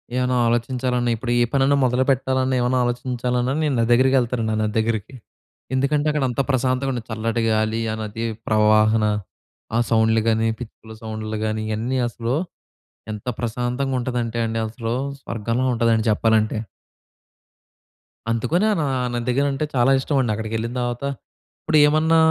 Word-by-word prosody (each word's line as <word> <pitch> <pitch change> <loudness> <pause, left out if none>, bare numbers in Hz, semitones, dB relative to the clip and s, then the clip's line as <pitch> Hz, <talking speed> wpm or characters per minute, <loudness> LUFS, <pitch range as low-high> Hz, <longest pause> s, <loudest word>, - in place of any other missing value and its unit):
ఏమన్నా 125 0 +1
ఆలోచించాలన్నా, 120 +1 0
ఇప్పుడు 120 +2 -4
ఏ - - +5
పనన్నా 140 +1 +3
మొదలుపెట్టాలన్నా, 130 +1 +1
ఏమన్నా 125 +1 +1
ఆలోచించాలన్నా, 125 +1 -1
నేను 145 -3 +1
నది 115 0 +1
దగ్గరికెళ్తానండి 125 -3 +2
ఆ - - -1
నది 105 -1 -2
దగ్గరికి. 110 +2 -2 0.6
ఎందుకంటే, 145 +3 +1
అక్కడ 150 -2 -1
అంత 125 +3 0
ప్రశాంతమైన 130 0 0
చల్లటి 115 +1 -1
గాలి, 110 +1 0
ఆ - - -2
నది 110 +2 -4 0.2
ప్రవాహన 110 0 +4 0.7
ఆ - - +3
సౌండ్లు 110 0 +3
కానీ, 110 0 +2
పిచ్చుకల 110 -1 -10
సౌండ్లు 110 0 -4
కానీ 110 0 -2
ఇయన్నీ 120 +5 -1
అసలు, 120 +2 -3 0.8
ఎంత 105 - -9
ప్రశాంతంగా 125 +3 -2
ఉంటదంటే 120 -2 -2
అండి 115 0 -2
అసలు 115 +1 -4 0.3
స్వర్గంలా 115 +2 -2
ఉంటదండి 115 -1 +2
చెప్పాలంటే. 110 0 +2 1.7
అందుకని 165 - +1
నా 150 - 0
ఆ - - -1
నది 120 -1 -2
దగ్గర 140 +3 +2
అంటే 135 +3 -1
చాలా 125 +1 +3
ఇష్టమండి. 130 -4 0
అక్కడికెళ్ళిన 110 +2 -3
తర్వాత, 120 +1 -3 0.6
ఇప్పుడేమన్నా 155 +1 +4
120 Hz, 135 wpm, -22 LUFS, 110-130 Hz, 1.7 s, ఏ